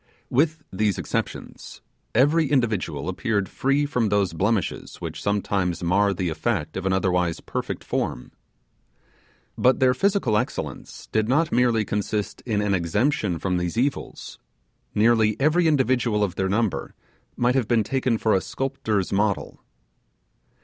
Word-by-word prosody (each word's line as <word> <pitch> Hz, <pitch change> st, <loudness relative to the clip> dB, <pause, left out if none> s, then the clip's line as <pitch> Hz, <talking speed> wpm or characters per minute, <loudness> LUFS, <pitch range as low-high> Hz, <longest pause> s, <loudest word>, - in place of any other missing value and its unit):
With 155 Hz, +4 st, +1 dB
these 105 Hz, 0 st, +1 dB
exceptions, -, -, -5 dB, 0.4 s
every 145 Hz, +5 st, +4 dB
individual 105 Hz, -, 0 dB
appeared 100 Hz, +1 st, -1 dB
free 140 Hz, +8 st, +1 dB
from 125 Hz, -6 st, 0 dB
those 100 Hz, -4 st, +1 dB
blemishes 100 Hz, +2 st, -1 dB
which -, -, -6 dB
sometimes 95 Hz, -4 st, -1 dB
mar 100 Hz, +4 st, +3 dB
the 95 Hz, -2 st, -2 dB
effect 80 Hz, 0 st, -2 dB
of 95 Hz, 0 st, -2 dB
an -, -, +1 dB
otherwise 90 Hz, -3 st, +1 dB
perfect -, -, -4 dB
form. -, -, -3 dB, 1.3 s
But 130 Hz, +1 st, +4 dB
their 130 Hz, -1 st, +4 dB
physical 195 Hz, -, +1 dB
excellence 120 Hz, +4 st, -4 dB
did 110 Hz, 0 st, +1 dB
not 155 Hz, +5 st, +2 dB
merely 120 Hz, -3 st, +2 dB
consist 105 Hz, 0 st, -2 dB
in 105 Hz, -3 st, +1 dB
an 100 Hz, -1 st, +1 dB
exemption 95 Hz, -, 0 dB
from 90 Hz, +2 st, -1 dB
these 90 Hz, +3 st, -2 dB
evils; 135 Hz, +3 st, -2 dB, 0.6 s
nearly 110 Hz, 0 st, +3 dB
every 160 Hz, +4 st, +3 dB
individual 125 Hz, -7 st, +2 dB
of 95 Hz, -4 st, -1 dB
their 95 Hz, 0 st, -1 dB
number 100 Hz, -8 st, -1 dB, 0.4 s
might 120 Hz, +1 st, +2 dB
have 130 Hz, -5 st, +1 dB
been 115 Hz, -2 st, +3 dB
taken 130 Hz, 0 st, 0 dB
for 110 Hz, 0 st, +1 dB
a 95 Hz, -, +3 dB
sculptor's 110 Hz, -8 st, -2 dB
model. 100 Hz, 0 st, -1 dB
105 Hz, 140 wpm, -24 LUFS, 95-130 Hz, 1.3 s, every